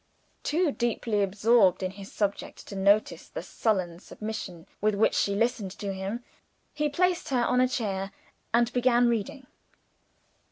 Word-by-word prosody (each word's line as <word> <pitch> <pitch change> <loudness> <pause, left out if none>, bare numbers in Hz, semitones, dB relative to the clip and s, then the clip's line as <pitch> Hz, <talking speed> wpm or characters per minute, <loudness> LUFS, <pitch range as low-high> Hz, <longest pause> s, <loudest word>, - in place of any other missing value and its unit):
Too 325 +1 +1
deeply 230 -4 0
absorbed 200 -1 +3
in 185 - -1
his 195 0 -11
subject 205 -1 -3
to 200 - -7
notice 200 +2 +2
the - - -6
sullen 185 -6 -1
submission 205 -5 -7 0.2
with 215 0 +2
which 210 - +3
she 200 - +1
listened 230 -2 0
to 200 -1 -3
him, 195 +5 -4 0.5
he 300 0 0
placed 360 +4 +1
her 250 -3 +2
on 250 +1 +3
a 255 - +4
chair, 195 -6 -2 0.4
and 235 +1 +2
began 245 -1 +4
reading. 255 +5 -2
215 Hz, 150 wpm, -28 LUFS, 195-245 Hz, 0.5 s, a